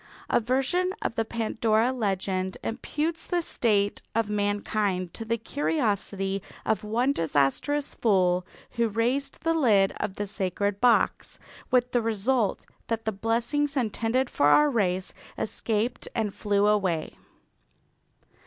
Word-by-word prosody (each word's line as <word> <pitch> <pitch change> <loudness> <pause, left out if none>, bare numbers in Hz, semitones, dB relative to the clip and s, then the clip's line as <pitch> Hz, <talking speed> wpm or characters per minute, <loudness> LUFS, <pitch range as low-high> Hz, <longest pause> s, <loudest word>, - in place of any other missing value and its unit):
A - - +4
version 270 - 0
of - - -1
the 225 - 0
Pandora 225 +1 +1
legend 190 -4 -1
imputes 310 +8 -3
the 350 -1 0
state 205 -8 +1
of 225 -2 +1
mankind 205 -3 -1
to 225 - -6
the 230 +1 -1
curiosity 205 -7 -1 0.2
of 215 -3 0
one 240 +6 +1
disastrous 165 - 0
fool 185 -5 +2 0.3
who 235 -1 +1
raised 240 +6 -1
the 330 - +2
lid 215 -11 +3
of 195 - -3
the 205 - -3
sacred 200 0 -2
box, 245 -1 +2 0.3
with 250 -1 +2
the 245 - +2
result 225 0 0 0.2
that 225 -1 -2
the 220 - +1
blessings 235 +8 0
intended 235 +2 0
for 145 - +2
our 295 - +5
race 190 -5 0 0.2
escaped 225 +2 -1
and 215 -3 -1
flew 205 -1 +1
away. 190 -6 +1
220 Hz, 130 wpm, -27 LUFS, 200-250 Hz, 0.3 s, our